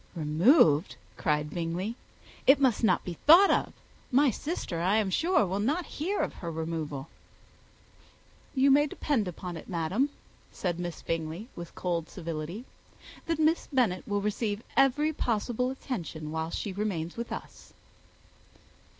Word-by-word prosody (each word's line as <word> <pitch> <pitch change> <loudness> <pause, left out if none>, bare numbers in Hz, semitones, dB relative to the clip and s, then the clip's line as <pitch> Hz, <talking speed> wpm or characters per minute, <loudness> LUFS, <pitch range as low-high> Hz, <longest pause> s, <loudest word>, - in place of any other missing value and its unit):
"Removed!" 160 - +4 0.2
cried 150 -3 0
Bingley. 175 +5 -2 0.5
"It 270 +1 +7
must 255 -4 +2
not 220 - +3
be 175 -3 -6
thought 355 +6 +9
of. - - +1 0.4
My 270 +1 +5
sister, 255 - -4
I 185 +4 +2
am 210 -3 +1
sure, 345 - +3
will 190 +2 -2
not 295 +12 0 0.2
hear 390 +6 0
of - - -2
her 170 - -6
removal." 160 -3 -4 1.5
"You 270 +1 +5
may 290 +2 +5
depend 275 -7 -1
upon 180 0 -6
it, - - -11
madam," 185 - 0 0.4
said 175 -2 -3
Miss 175 -2 -5
Bingley, 165 +7 -3
with 170 -1 -9
cold 170 -3 -2
civility, 170 +5 -5 0.6
"that 330 -1 0
Miss 315 +2 +2
Bennet 230 -10 +1
shall 205 0 0
receive 210 +1 -2
every 285 +4 +3
possible 240 0 -1
attention 170 - -5
while 160 0 -2
she 195 +3 -4
remains 185 -5 -3
with 235 0 -5
us." - - -8
200 Hz, 140 wpm, -29 LUFS, 165-260 Hz, 1.5 s, thought